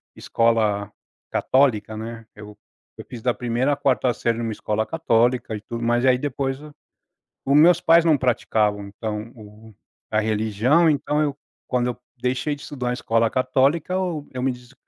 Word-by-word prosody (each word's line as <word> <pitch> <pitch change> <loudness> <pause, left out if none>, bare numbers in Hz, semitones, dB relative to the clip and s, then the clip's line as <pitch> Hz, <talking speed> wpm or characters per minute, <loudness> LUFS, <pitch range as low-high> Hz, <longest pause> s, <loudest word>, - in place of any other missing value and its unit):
escola 110 -3 0 0.4
católica, 120 -6 +1
né. 115 +1 -7
Eu 105 0 -12 0.4
eu - - -9
fiz 120 -2 -8
da 125 +1 +1
1ª 125 +4 0
a - - 0
4ª 130 -2 +1
série 115 0 -1
numa 115 -1 -3
escola 105 +1 -2
católica, 120 -7 +1
e 105 - -7
tudo 115 +2 -6
mais, 120 +1 +1
e - - +3
aí 130 -1 +5
depois 135 0 -3 0.9
o 140 - +1
meus 170 +4 +6
pais 165 0 +5
não 160 -3 +4
praticavam, 105 -5 0
então 105 +2 -5
o 110 0 -14 0.4
a 110 - +1
religião, 110 +9 +2
então 150 +1 0
eu 145 -2 -1 0.3
quando 125 -1 0
eu 125 - -3 0.2
deixei 125 +4 -1
de 140 - -14
estudar 125 -4 -4
em - - 0
escola 115 -2 +1
católica, 135 +6 +1
eu 175 -6 -2
eu 125 - -4
me 135 - +1
des 125 +1 -14
125 Hz, 175 wpm, -22 LUFS, 110-140 Hz, 0.9 s, meus